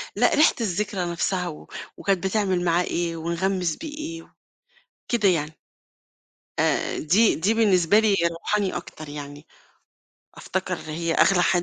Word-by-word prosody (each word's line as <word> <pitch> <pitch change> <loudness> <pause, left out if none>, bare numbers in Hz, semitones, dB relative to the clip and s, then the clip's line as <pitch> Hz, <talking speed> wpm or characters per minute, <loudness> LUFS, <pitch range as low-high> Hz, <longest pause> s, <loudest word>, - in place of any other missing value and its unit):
لأ - - +3
ريحة 305 +2 +5
الذكرى 195 -2 -1
نفْسها 180 +1 -1
و 155 -3 -9 0.3
وكانت 195 -1 0
بتعمل 190 -3 0
معاه 170 +1 +2
إيه 170 -1 -2
ونغمِّس 170 +1 -1
بيه 300 -2 -8
إيه، 330 +2 -7 0.8
كده 225 -5 +2
يعني. 155 -3 0 1.0
آآ، - - +1
دي 200 +9 +3
دي 195 +7 +1
بالنسبة 205 -4 +4
لي 215 -2 +3 0.2
روحاني 195 +3 -1
أكتر 155 -1 -9
يعني، 145 0 -9 0.9
أفتكر - - -3
اللي 155 - -8
هي 165 +1 -1
أغلى 180 -2 +4
حد 175 -1 +2
180 Hz, 140 wpm, -24 LUFS, 165-210 Hz, 1.0 s, ريحة